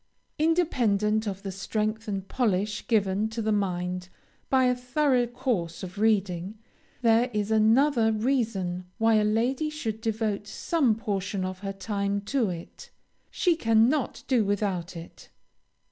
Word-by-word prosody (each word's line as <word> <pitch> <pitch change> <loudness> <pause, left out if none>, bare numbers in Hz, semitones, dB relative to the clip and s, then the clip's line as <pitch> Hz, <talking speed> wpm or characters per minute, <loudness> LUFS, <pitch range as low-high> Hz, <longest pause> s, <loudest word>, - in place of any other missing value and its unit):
Independent 225 - +2
of 195 0 -4
the 195 - -4
strength 215 +3 -2
and 195 -2 -3
polish 210 -4 -1
given 205 -1 +1
to 225 +1 -6
the 220 -1 0
mind 180 -2 -1 0.4
by 260 -1 +4
a 250 - +4
thorough 250 0 +1
course 235 -10 -2
of 185 +2 -7
reading, 200 -2 +1 0.5
there 230 +2 +4
is 210 0 -1
another 225 +2 +4
reason 215 -6 -1
why 225 0 +3
a 215 -1 +4
lady 240 +8 +1
should 225 -8 -4
devote 220 -2 -2
some 275 -7 +1
portion 200 -3 -2
of 185 0 -5
her 195 0 -4
time 200 0 -2
to 230 +1 0
it; 170 -1 -8 0.4
she 350 -3 +2
cannot 235 +1 +2
do 250 -4 +3
without 195 -4 -2
it. 165 +1 -12
215 Hz, 140 wpm, -27 LUFS, 195-240 Hz, 0.5 s, by